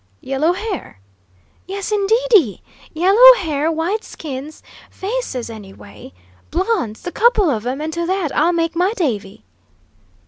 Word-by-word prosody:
"Yellow 285 +6 0
hair?" 380 - -6 0.7
"Yes, 395 +2 -5
indeedy! 420 - +2 0.3
Yellow 405 +10 +7
hair, 310 -3 -1
white 345 +7 -2
skins, 295 0 -8 0.3
faces, 390 - -4
anyway. 195 - -12 0.4
Blondes, 350 - -2
the 355 - -5
couple 425 -7 +3
of 230 -2 -3
'em; 265 +3 -3
and 315 +1 -4
to 340 +1 -2
that 370 -5 -1
I'll 320 +4 +3
make 330 -1 -1
my 365 +5 +1
davy!" 215 - -3
335 Hz, 130 wpm, -19 LUFS, 270-395 Hz, 0.7 s, Yellow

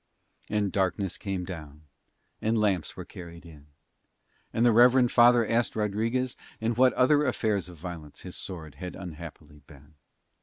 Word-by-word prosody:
And 105 -2 0
darkness 95 -1 0
came 95 -3 -3
down 75 -4 -9 0.6
and 110 +1 +1
lamps 100 -6 0
were - - -6
carried 85 -1 -11
in: 75 -3 -14 0.8
and 115 - +1
the 120 - +6
reverend 125 +2 +5
father 120 -1 +6
asked 115 -2 +1
Rodriguez 115 +4 -1 0.2
in 115 +1 0
what 125 +2 +4
other 145 +3 +4
affairs 110 - 0
of 90 - -12
violence 80 -3 -8
his - - -8
sword 80 -5 -7
had 90 -1 -5
unhappily 85 -4 -10
been. 75 0 -17
100 Hz, 150 wpm, -28 LUFS, 85-115 Hz, 0.8 s, the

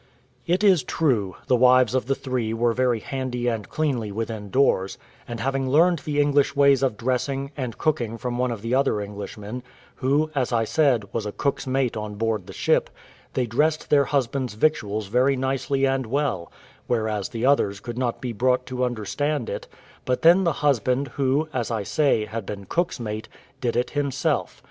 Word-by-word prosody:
It 180 +4 +1
is 190 -6 +5
true, 120 - 0
the 125 - +3
wives 125 +1 +5
of 130 -2 0
the 135 - +1
three 120 -5 -2
were 120 0 +2
very 125 -2 +1
handy 125 -2 -3
and 115 -3 -2
cleanly 130 -9 -1
within 110 -1 -4
doors; 100 -6 +2 0.3
and 120 -1 -5
having 135 0 -1
learned 170 +4 +4
the 145 0 -2
English 145 0 +3
ways 140 -1 +5
of 130 -6 0
dressing, 135 +3 -1
and 125 -5 -4
cooking 120 -7 -1
from 120 +1 -3
one 125 0 +1
of 115 -3 -5
the 115 +2 -2
other 135 -5 +2
Englishmen, 105 +3 -6 0.4
who, 145 +4 +1
as 130 -4 0
I 115 -1 +2
said, 125 -3 +2
was 110 -2 -2
a - - -3
cook's 140 +4 -2
mate 130 -2 0
on 105 -1 -5
board 110 -3 -1
the - - -8
ship, - - +1 0.5
they 130 - +1
dressed 150 +7 0
their 140 -1 +5
husbands' 130 -4 -1
victuals 110 -6 0
very 125 +7 +2
nicely 135 +1 0
and 135 -2 0
well; 130 -9 -1 0.4
whereas 110 -4 -1
the 115 0 -2
others 105 -8 +2
could 120 +2 -6
not 120 -2 -1
be 125 -2 -4
brought 125 +3 +1
to 125 0 -3
understand 125 +4 -1
it; - - -5 0.4
but 125 0 -1
then 175 +3 +6
the 170 - +2
husband, 130 0 +2
who, 140 +4 0
as 120 -3 -1
I 110 -3 -1
say, 135 -3 +2
had 110 -1 -6
been 100 -1 -6
cook's 175 - -1
mate, 110 -1 -5 0.3
did 120 -2 -1
it 125 +1 0
himself. 140 -2 -1
125 Hz, 185 wpm, -24 LUFS, 115-140 Hz, 0.5 s, then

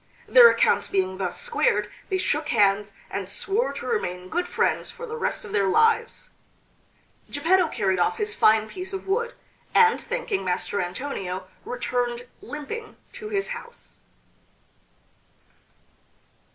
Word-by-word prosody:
Their 485 -1 +9
accounts - - +2
being 190 -1 -1
thus 185 -2 -2
squared 485 -1 +1 0.2
they 380 - +1
shook 300 -4 0
hands, 200 -1 +2 0.2
and 195 -1 -4
swore 410 - -1
to - - -6
remain 180 - -2
good 355 - -1
friends - - 0
for 485 - -8
the 460 -1 -6
rest 465 - -2
of 205 - -9
their 200 -1 +2
lives. 450 - +2 1.0
Geppetto 345 +5 +3
carried 195 - 0
off 440 - +2
his 430 -1 -2
fine 220 - +4
piece 375 - -6
of 385 - -5
wood, 470 +5 0 0.4
and 455 0 +5
thanking 475 - -2
Master 185 +2 -1
Antonio 185 -2 -4 0.2
returned 245 -1 -2 0.2
limping 430 +10 -7 0.2
to 425 - -7
his 400 0 -1
house. 475 -1 -9
295 Hz, 135 wpm, -25 LUFS, -, 1.0 s, Their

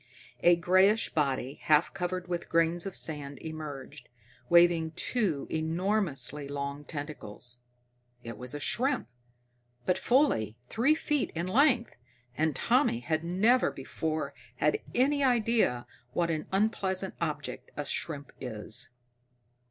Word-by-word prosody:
A 175 0 +6
grayish 185 +5 +4
body, 135 -3 -1
half 155 +1 +3
covered 180 0 -3
with 175 -1 -3
grains 165 +2 +2
of 195 - -6
sand 145 -3 +2
emerged, 155 -3 -8 0.4
waving 170 -2 +5
two 195 - 0
enormously 160 - 0
long 140 0 -4
tentacles. 130 -6 -7 0.6
It 115 -1 -6
was 125 +5 -6
a - - -4
shrimp, 255 - 0 0.8
but 180 0 +1
fully 215 - +2
three 265 +7 +3
feet 295 -3 0
in 170 +2 -1
length, 240 +3 +3 0.4
and 155 0 +1
Tommy 235 - +2
had 160 +5 -1
never 210 +9 +3
before 155 +1 -3 0.2
had 150 +4 +1 0.2
any 280 +3 +3
idea 230 - +2 0.3
what 170 -1 +1
an 155 -1 -3
unpleasant 190 -2 0
object 150 -3 -4
a 145 - -2
shrimp 145 0 -4
is. 120 0 -3
165 Hz, 120 wpm, -30 LUFS, 145-195 Hz, 0.8 s, A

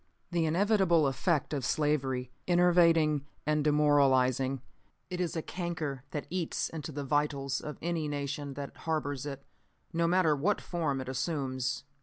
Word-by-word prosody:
"The 170 -2 +1
inevitable 185 -2 +3
effect 150 +3 0
of 140 -3 -1
slavery 130 -3 0 0.2
is 180 - +2
enervating 165 -5 +4 0.2
and 150 0 +1
demoralizing. 135 -3 +3 0.5
It 180 0 -2
is 175 -1 -2
a 160 - -2
canker 160 -7 -4
that 150 - -4
eats 180 -3 -1
into 155 -1 -6
the 145 0 -4
vitals 140 -1 0
of 150 - -6
any 165 -2 -1
nation 145 -1 -3
that 140 0 -6
harbors 145 -4 -2
it, 140 -1 -7 0.5
no 170 0 +2
matter 170 -3 +3
what 180 +9 +1
form 155 -6 -2
it 130 - -7
assumes. 130 -1 -2
150 Hz, 150 wpm, -30 LUFS, 135-165 Hz, 0.5 s, enervating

